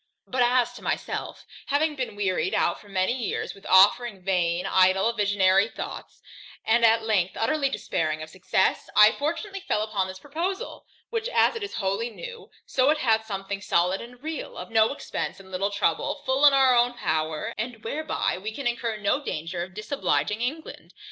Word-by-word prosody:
But, 255 Hz, -1 st, -1 dB
as 245 Hz, 0 st, +3 dB
to -, -, -11 dB
myself, -, -, -4 dB, 0.2 s
having 300 Hz, +2 st, +1 dB
been 255 Hz, -6 st, -4 dB
wearied 190 Hz, -5 st, 0 dB
out 175 Hz, -, +1 dB
for 205 Hz, -, -17 dB
many 190 Hz, +3 st, +1 dB
years 250 Hz, -4 st, -3 dB
with 195 Hz, -, -13 dB
offering 195 Hz, +1 st, +4 dB
vain, 180 Hz, -2 st, 0 dB
idle, 190 Hz, +4 st, +3 dB
visionary 200 Hz, -2 st, +3 dB
thoughts, -, -, -8 dB, 0.4 s
and 235 Hz, +1 st, +3 dB
at 225 Hz, 0 st, +5 dB
length 195 Hz, -5 st, 0 dB
utterly 275 Hz, +5 st, +1 dB
despairing 155 Hz, -, -2 dB
of 155 Hz, -, -9 dB
success, 185 Hz, +1 st, 0 dB
I 210 Hz, +1 st, +8 dB
fortunately 365 Hz, -, -3 dB
fell 215 Hz, -, -1 dB
upon 205 Hz, -3 st, -1 dB
this 185 Hz, 0 st, -8 dB
proposal, 350 Hz, -, -5 dB, 0.2 s
which, 455 Hz, 0 st, -2 dB
as -, -, +3 dB
it 455 Hz, -, -5 dB
is 405 Hz, -, -5 dB
wholly 200 Hz, +4 st, -1 dB
new, 475 Hz, -, -9 dB, 0.2 s
so 260 Hz, +1 st, +2 dB
it 310 Hz, -, +3 dB
hath 220 Hz, -6 st, +1 dB
something 195 Hz, -1 st, -4 dB
solid 180 Hz, 0 st, +1 dB
and 245 Hz, +2 st, -12 dB
real, 315 Hz, -1 st, -5 dB
of -, -, -8 dB
no 220 Hz, -1 st, +4 dB
expence 280 Hz, -, -5 dB
and 190 Hz, -1 st, -15 dB
little 190 Hz, +2 st, -1 dB
trouble, 205 Hz, -, -1 dB
full 265 Hz, +3 st, +5 dB
in 285 Hz, -, +6 dB
our 265 Hz, -2 st, +5 dB
own 240 Hz, 0 st, +3 dB
power, 155 Hz, +3 st, -2 dB
and 225 Hz, 0 st, -5 dB
whereby 300 Hz, -, -2 dB
we 215 Hz, +3 st, -5 dB
can 275 Hz, +5 st, -7 dB
incur 235 Hz, -2 st, -1 dB
no 210 Hz, +8 st, 0 dB
danger 170 Hz, -, -4 dB
in 185 Hz, 0 st, -18 dB
disobliging 210 Hz, -, -1 dB
England. 300 Hz, +6 st, -5 dB
220 Hz, 180 wpm, -25 LUFS, 190-265 Hz, 0.4 s, I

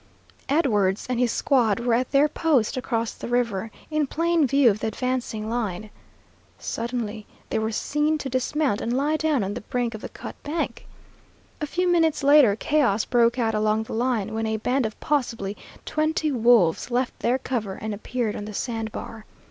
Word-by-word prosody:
Edwards 210 Hz, -, +2 dB
and 245 Hz, -, 0 dB
his 245 Hz, -2 st, +2 dB
squad 235 Hz, -8 st, +2 dB
were 235 Hz, 0 st, +1 dB
at 250 Hz, +2 st, +1 dB
their 280 Hz, +1 st, +4 dB
post 285 Hz, -6 st, +1 dB
across 230 Hz, -3 st, -2 dB
the -, -, -8 dB
river, 230 Hz, -4 st, 0 dB, 0.2 s
in 305 Hz, -2 st, +1 dB
plain 330 Hz, 0 st, +2 dB
view 275 Hz, -2 st, +5 dB
of 205 Hz, -, -4 dB
the -, -, -2 dB
advancing 240 Hz, -2 st, -2 dB
line. 215 Hz, -3 st, -3 dB, 0.7 s
Suddenly 230 Hz, -3 st, -4 dB, 0.2 s
they -, -, +1 dB
were 220 Hz, 0 st, -1 dB
seen 295 Hz, +7 st, 0 dB
to 285 Hz, -, -5 dB
dismount 260 Hz, -2 st, 0 dB
and 240 Hz, +2 st, -1 dB
lie 295 Hz, +3 st, +1 dB
down 310 Hz, -7 st, +1 dB
on 195 Hz, +1 st, -3 dB
the -, -, -5 dB
brink 245 Hz, +1 st, -2 dB
of 220 Hz, -, -7 dB
the -, -, -6 dB
cut -, -, -9 dB
bank. 315 Hz, +3 st, -3 dB, 0.7 s
A 300 Hz, -, -1 dB
few 360 Hz, +4 st, 0 dB
minutes 325 Hz, -5 st, +2 dB
later 280 Hz, -7 st, +6 dB
chaos 225 Hz, -4 st, +1 dB
broke 235 Hz, 0 st, +3 dB
out 225 Hz, -3 st, +1 dB
along 215 Hz, +1 st, +1 dB
the -, -, -8 dB
line, 235 Hz, -3 st, 0 dB
when 220 Hz, 0 st, -1 dB
a 220 Hz, 0 st, -1 dB
band 250 Hz, +2 st, 0 dB
of 215 Hz, -, -11 dB
possibly 230 Hz, -9 st, -1 dB, 0.3 s
twenty 310 Hz, 0 st, 0 dB
wolves 230 Hz, -, +3 dB
left 245 Hz, +1 st, -1 dB
their 245 Hz, +2 st, +1 dB
cover 225 Hz, -7 st, -3 dB
and 220 Hz, 0 st, -5 dB
appeared 220 Hz, +1 st, -3 dB
on 205 Hz, -, -5 dB
the 210 Hz, -1 st, -7 dB
sand 225 Hz, -2 st, -3 dB
bar. 220 Hz, 0 st, -8 dB
240 Hz, 185 wpm, -24 LUFS, 220-280 Hz, 0.7 s, later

